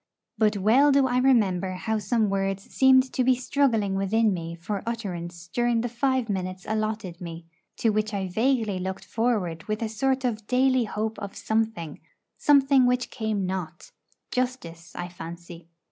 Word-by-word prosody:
But 215 -1 +2
well 240 +9 +5
do 275 -1 +4
I 250 -1 +1
remember 195 -8 +2
how 220 +4 -2
some 215 +2 +1
words 195 0 -1
seemed 260 +1 +4
to 255 - +1
be 255 +1 +4
struggling 240 -6 +1
within 205 +2 +2
me 170 -1 -5
for 195 +4 -4
utterance 175 -7 -5
during 240 -1 +2
the 245 - -2
five 260 0 0
minutes 185 -2 -4
allotted 215 -4 -3
me, 165 -1 -7 0.3
to 225 - +2
which 215 +1 0
I 195 -2 -2
vaguely 220 -1 0
looked 190 +1 -5
forward 205 -9 -1
with 215 +1 -2
a - - 0
sort 260 +4 0
of 220 -3 -2
daily 255 -1 +3
hope 220 +1 -3
of 200 -1 -7
something; 220 -8 -2 0.4
something 275 -3 +4
which 250 0 0
came 220 -4 -2
not 180 -3 -5 0.4
justice, 175 -10 -4
I 175 - -4
fancy. 170 -1 -10
215 Hz, 160 wpm, -26 LUFS, 185-245 Hz, 0.4 s, well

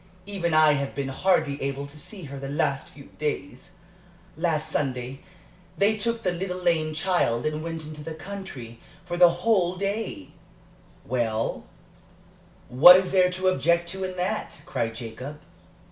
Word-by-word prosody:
Even 195 -4 -2
I 155 -1 +6
have 140 -1 -2
been 140 -1 -2
hardly 145 -1 +1
able 140 +1 -2
to 140 +1 -11
see 195 +4 -7
her 140 -1 -7
the 135 0 -6
last 140 -1 -1
few 140 -1 -14
days. 145 +1 -4 0.6
Last 160 -1 0
Sunday 130 -2 -2 0.6
they 205 +2 +3
took 230 +2 -2
the 180 - +1
little 180 +1 -3
lame 165 -4 +1
child 160 -9 +1
and 155 0 -1
went 165 -1 -5
into 150 -1 -8
the 160 +1 -6
country 145 - -8 0.3
for 175 - -4
the 175 0 +7
whole 180 0 +1
day 200 - -3 0.4
" - - -28
"Well, 115 -2 -1 1.0
what 155 +9 +9
is 185 0 +2
there 185 -1 +4
to 185 +1 +1
object 170 -2 +2
to 190 +1 -4
in 185 -1 -4
that?" 190 +4 -3
cried 115 -1 -2
Jacob. 125 +6 -7
160 Hz, 160 wpm, -26 LUFS, 140-185 Hz, 1.0 s, what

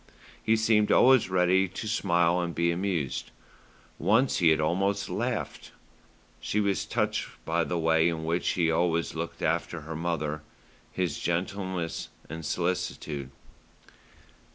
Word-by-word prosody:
He 110 - +3
seemed 110 -1 +3
always 130 -6 +5
ready 95 +1 +3
to 95 +4 -6
smile 85 -4 +2
and 85 -1 -3
be 85 0 +2
amused. 85 -6 -2 0.7
Once 125 +6 +3
he 85 -3 +4
had 80 -1 +3
almost 95 +6 0
laughed. - - -3 0.7
She 105 - -1
was 100 -2 0
touched - - -1 0.2
by 85 +1 +1
the 85 +3 -2
way 80 0 +3
in 80 -1 -4
which 85 +2 0
he 85 -2 +2
always 85 0 +1
looked - - -5
after 85 - -1
her 80 +2 -7
mother, 75 -2 -2 0.5
his 90 -6 -2
gentleness 90 0 -2 0.2
and 80 +2 -7
solicitude. 80 -5 -2
85 Hz, 130 wpm, -28 LUFS, 80-95 Hz, 0.7 s, always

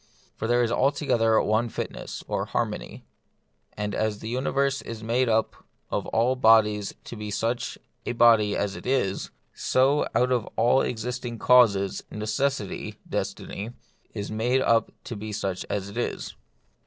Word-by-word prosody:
For 110 - -3
there 120 +1 +3
is 115 - 0
altogether 125 -4 +2
one 110 +3 +1
fitness - - -6
(or - - -1
harmony.) - - -3 0.7
And 105 0 -2
as 110 -1 0
the 110 - -7
uni 130 +3 -1
verse 140 0 +1
is 115 -1 -7
made 120 +2 +1
up 110 0 +2
out - - -25 0.3
of - - -1
all 120 +3 +2
bodies 110 -4 +4
to - - -8
be 105 -1 -6
such 115 +3 -2 0.3
a - - -2
body 115 -3 +5
as 100 -1 -1
it - - -8
is, 125 -8 0 0.2
so 135 +3 +2
out 125 +2 +3
of 120 -4 +1
all 120 +4 +4
existing 120 +1 -3
causes 105 -6 +4
necessity 110 +1 -2
(destiny) 110 +4 -4 0.4
is 105 -1 -5
made 120 +4 +1
up 115 -2 +3
to 120 - -6
be 110 +1 -6
such 95 -2 -3
as 100 -1 -2
it 100 - -9
is. - - -3
115 Hz, 160 wpm, -26 LUFS, 105-125 Hz, 0.7 s, body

